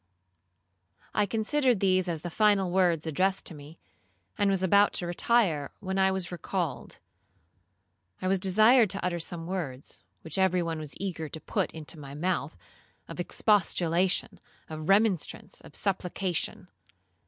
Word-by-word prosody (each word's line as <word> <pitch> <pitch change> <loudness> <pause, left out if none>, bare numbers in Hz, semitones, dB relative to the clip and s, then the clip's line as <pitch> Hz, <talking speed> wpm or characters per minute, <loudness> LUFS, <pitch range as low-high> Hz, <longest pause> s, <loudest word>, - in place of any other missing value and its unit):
I 210 -1 +2
considered 235 +3 +1
these 185 -1 +2
as 165 -3 -3
the 175 - -6
final 200 -2 +3
words 175 -4 +2
addressed 185 +5 0
to - - -5
me, 150 +2 -12 0.6
and 205 - +2
was 190 -1 +1
about 200 +2 +4
to 175 - -2
retire, 175 - +1
when 190 -1 -3
I 190 0 +4
was 190 -2 -3
recalled. 175 -4 -4 1.2
I 185 - -3
was 190 0 +2
desired 215 +5 +5
to 195 0 -2
utter 175 -1 -1
some 165 0 -4
words, 160 -8 -5 0.2
which 160 +3 -3
every 185 -2 +3
one 165 -1 -3
was 155 -2 -6
eager 170 -5 -4
to 160 - -7
put - - -2
into 160 0 -7
my 140 -1 -9
mouth, 160 -2 -2 0.5
of - - -9
expostulation, 180 -2 +1 0.3
of 155 +1 -6
remonstrance, 200 -4 +1
of - - -14
supplication. 185 -2 -1
185 Hz, 145 wpm, -28 LUFS, 165-195 Hz, 1.2 s, desired